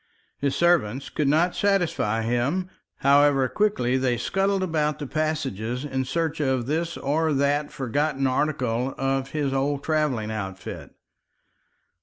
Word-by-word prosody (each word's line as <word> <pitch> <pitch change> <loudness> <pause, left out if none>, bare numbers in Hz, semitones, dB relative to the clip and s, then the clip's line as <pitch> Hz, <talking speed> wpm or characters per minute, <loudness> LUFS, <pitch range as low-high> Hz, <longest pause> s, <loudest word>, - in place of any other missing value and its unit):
His 140 -1 0
servants 140 -8 +2
could 150 - 0
not 165 +5 +3
satisfy 170 - +1
him, 135 +11 0 0.3
however 140 -1 +4
quickly 130 -10 +1
they 130 -2 +1
scuttled 195 +9 0
about 155 -4 0
the 145 - -5
passages 135 -5 -2
in 130 -2 -2
search 160 +3 -1
of 130 -4 0
this 165 +5 -2
or 155 +3 0
that 145 +1 +1
forgotten 135 +2 -1
article 130 -2 0
of 135 0 -1
his 145 -3 -1
old 140 +1 0
travelling 145 -9 0
outfit. 95 -3 -6
140 Hz, 130 wpm, -25 LUFS, 130-155 Hz, 0.3 s, however